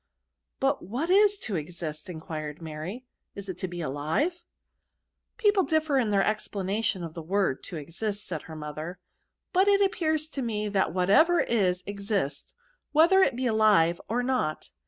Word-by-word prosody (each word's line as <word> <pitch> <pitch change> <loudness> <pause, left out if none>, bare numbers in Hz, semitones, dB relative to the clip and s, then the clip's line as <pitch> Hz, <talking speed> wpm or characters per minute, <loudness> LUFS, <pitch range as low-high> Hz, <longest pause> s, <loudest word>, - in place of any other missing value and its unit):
But 275 +1 +1
what 260 - -2
is 410 +1 +5
to 210 - -2
exist 155 -1 -5
J" 180 - -6
enquired 155 -2 -6
Mary; 165 +10 -6
" - - -53
is 200 -1 -7
it 180 - -6
to 185 - -2
be 175 0 -7
aHve 155 - 0 0.4
?" - - -53
" - - -56
People 415 -4 +4
differ 315 -5 +1
in 230 -4 +1
their 195 -1 +3
explanation 205 -2 -1
of 165 -2 -6
the 165 - -6
word 185 -4 0
to - - -7
exist," 200 +8 -4
said 165 -5 -4
her 160 - -7
mother: 155 +4 -6 0.3
" - - -56
but 380 +2 +4
it 400 0 +5
2i^ears 315 -6 +1
to 275 - -4
me 215 -3 -2
that 195 -5 +1
whatever 200 - +4
is 185 -6 +1
exists, 200 -8 -2 0.4
whether 340 +6 +6
it 275 -9 +3
be 255 +1 -2
alive 210 -7 +4
or 240 +3 0
not. 245 -12 -1
200 Hz, 180 wpm, -27 LUFS, 165-270 Hz, 0.4 s, whether